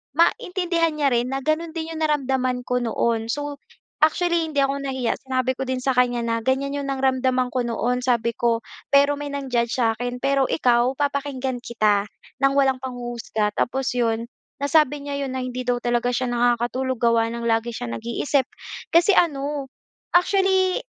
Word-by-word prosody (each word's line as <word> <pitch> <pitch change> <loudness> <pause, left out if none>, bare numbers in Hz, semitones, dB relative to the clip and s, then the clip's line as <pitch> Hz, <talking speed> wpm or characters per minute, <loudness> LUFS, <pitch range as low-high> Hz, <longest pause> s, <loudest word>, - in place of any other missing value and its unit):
maintindihan 345 -2 +1
niya 290 -2 +2
rin 245 +2 0
na 270 - -2
gano'n 315 +3 -1
din 325 -1 -4
'yong 320 - -6
naramdaman 265 -4 0
ko 250 - +1
noon. 230 -1 0
So, 290 0 -4 0.5
actually 340 +1 +1
hindi 285 -3 0
ako 275 +1 +1
nahiya, 260 -3 -1
sinabi 260 0 0
ko 265 - -3
din 255 0 -2
sa 265 0 0
kanya 245 -1 +3
na, 230 0 0
"Ganyan 275 +2 0
'yong 280 -1 -4
naramdaman 260 -1 +1
ko 250 -1 -1
noon." 240 +1 -1
Sabi 235 -2 +1
ko, 230 -1 +1 0.3
"Pero 285 +1 +5
may 290 -1 -5
nang-judge 250 -4 -1
sa 225 -1 +2
'kin 245 +1 -4
pero 275 0 +2
ikaw 245 -2 +2
papakinggan 280 -2 -2
kita 215 -4 +1 0.4
ng 275 - +4
walang 270 -2 +3
panghuhusga." 240 -4 -3
Tapos 265 +1 0
'yon, 230 -1 0 0.3
nasabi 290 0 +2
niya 285 0 -4
'yon 260 - -5
na 260 - -2
hindi 255 0 -4
daw 245 0 +1
talaga 240 0 +1
siya 255 0 -1
nakakatulog 245 +2 +1
gawa 230 -1 +3
ng 235 0 -5
lagi 225 +1 +1
siya 120 - -5
nag-iisip. 235 - -1 0.5
Kasi 340 +4 +6
ano, 285 -3 +1 0.5
actually 380 0 +3
260 Hz, 170 wpm, -23 LUFS, 240-285 Hz, 0.5 s, Kasi